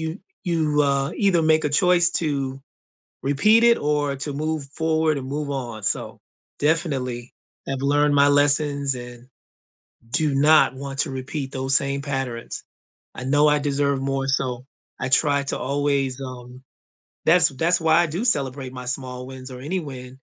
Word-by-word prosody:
you 160 +4 -4 0.2
you, 155 -4 +1
uh, 140 +1 0
either 190 -5 +2
make 155 0 +3
a - - +2
choice 175 +3 +4
to 135 -3 -2 0.6
repeat 210 +12 +4
it 235 0 +5
or 145 -1 0
to 145 +2 -5
move 155 +1 -2
forward 160 -2 +1
and 130 - -7
move 145 +1 -3
on, 120 -6 -5
so 105 - -2 0.4
definitely 135 -6 -1 0.4
have 135 -1 -3
learned 145 +1 +3
my 140 0 +5
lessons 145 -1 +2
and 120 0 -10 0.9
do 150 +2 +1
not 155 +2 +5
want 135 0 -7
to 145 - 0
repeat 135 +1 -5
those 135 0 -1
same 140 0 +1
patterns. 135 -4 -4 0.5
I 130 - -6
know 145 +3 +4
I 150 - +3
deserve 140 -1 0
more, 135 0 -1
so 130 -2 -1 0.4
I 130 - -1
try 140 +1 +3
to - - -2
always, 140 -2 -1
um 125 0 -9 0.6
that's 175 +3 +5
that's 165 +6 +1
why 160 -1 +4
I - - -1
do 170 +8 -3
celebrate 135 - -1
my 125 -1 -8
small 125 0 -5
wins 130 0 -9
or 125 - -8
any 180 +7 -2
win 130 -3 -9
140 Hz, 165 wpm, -23 LUFS, 130-155 Hz, 0.9 s, it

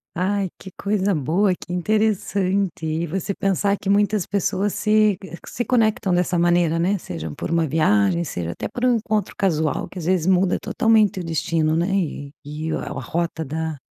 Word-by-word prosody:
Ai, 190 +1 0
que 190 - -9
coisa 200 -1 0
boa, 170 +7 +2
que 175 - -11
interessante. 195 -2 0
E 160 +2 -1
você 190 +4 -2
pensar 200 +1 +1
que 195 - -3
muitas 205 -1 +2
pessoas 200 0 0
se 215 -2 +3
que, 190 - -10
eh, 170 - -8
que - - -11
se 240 - -2
conectam 220 -6 +1
dessa 180 0 +1
maneira, 175 -1 +3
né. 185 +4 +1
Seja 80 - -6
por 75 - -5
uma 165 -1 +2
viagem, 155 -1 +2
seja 85 - -4
até - - -5
por 245 - -6
um 250 -1 +4
encontro 215 -2 -2
casual, 160 -6 0
que 185 - -12
às 160 - -6
vezes, 180 -1 +1
muda 185 0 +3
totalmente 220 -5 +2
o - - -6
destino, 160 -1 0
né, 170 +3 +1
e 145 -6 -3
e 150 +2 -5
a - - -3
rota 165 +4 -3
da 160 +2 -3
180 Hz, 190 wpm, -22 LUFS, 160-200 Hz, -, um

